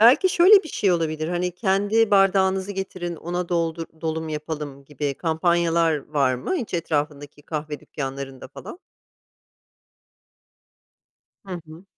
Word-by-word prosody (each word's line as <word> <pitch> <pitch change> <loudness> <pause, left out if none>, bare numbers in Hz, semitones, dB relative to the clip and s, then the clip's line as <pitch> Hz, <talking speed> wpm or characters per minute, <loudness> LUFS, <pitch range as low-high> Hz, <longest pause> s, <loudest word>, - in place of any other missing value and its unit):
Belki 260 - +7
şöyle 385 +3 +7
bir 320 - -9
şey 195 -8 +1
olabilir, 155 -1 -1
hani, 180 0 -1
kendi 205 +3 +2
bardağınızı 195 0 +3
getirin 185 -3 -4
ona 175 +2 -3
doldur 165 -1 -1 0.2
dolum 160 0 -2
yapalım 150 -2 -5
gibi 145 -1 -3
kampanyalar 165 0 +2
var 140 -4 +2
mı 245 - -2
hiç 235 - -4
etrafındaki 145 -3 -2
kahve 150 -1 -5
dükkanlarında 135 -1 -6
falan? 355 - -10 2.7
Hı 180 -2 -5
hı. 160 +4 -13
170 Hz, 120 wpm, -24 LUFS, 150-190 Hz, 2.7 s, Belki